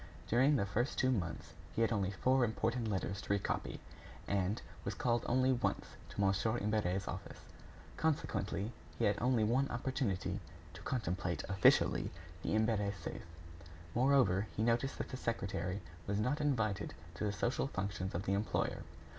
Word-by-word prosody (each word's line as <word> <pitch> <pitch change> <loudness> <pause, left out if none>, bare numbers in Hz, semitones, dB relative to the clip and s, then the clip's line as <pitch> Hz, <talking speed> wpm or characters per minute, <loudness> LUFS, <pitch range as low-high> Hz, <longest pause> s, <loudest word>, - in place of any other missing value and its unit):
During 130 +6 +4
the 115 - +2
first 120 +7 -1
two 130 - +3
months, 90 -9 -2 0.2
he 115 - +3
had 115 - +2
only 100 -4 +1
four 130 +7 +3
important 115 +1 0
letters 100 -1 -1
to - - -11
recopy, 100 -1 0 0.5
and 100 +2 +1 0.2
was 100 - -3
called 120 +1 +1
only 130 +1 +4
once 125 - -1 0.2
to - - -8
Mon. 100 -1 +4 0.3
Imbert's 100 -3 0
office; - - -6 0.6
consequently, 140 -8 0 0.3
he - - +2
had 105 0 +2
only 125 -2 +3
one 130 +6 +2
opportunity 120 -6 -1 0.3
to - - -10
contemplate, 90 -8 -1
officially, 95 -2 +4 0.3
the - - 0
Imbert 110 -2 +2
safe. 80 - -6 0.7
Moreover, 125 -6 +4
he 110 - +2
noticed 120 +4 +1
that - - -4
the 130 - -4
secretary 100 -6 -2 0.3
was 100 0 0
not 130 +8 +1
invited 110 -8 0 0.2
to 85 - -5
the 105 - +1
social 120 +6 0
functions 95 -4 -3
of 90 - -1
the 95 - 0
employer. 100 +2 0
110 Hz, 155 wpm, -35 LUFS, 100-125 Hz, 0.7 s, During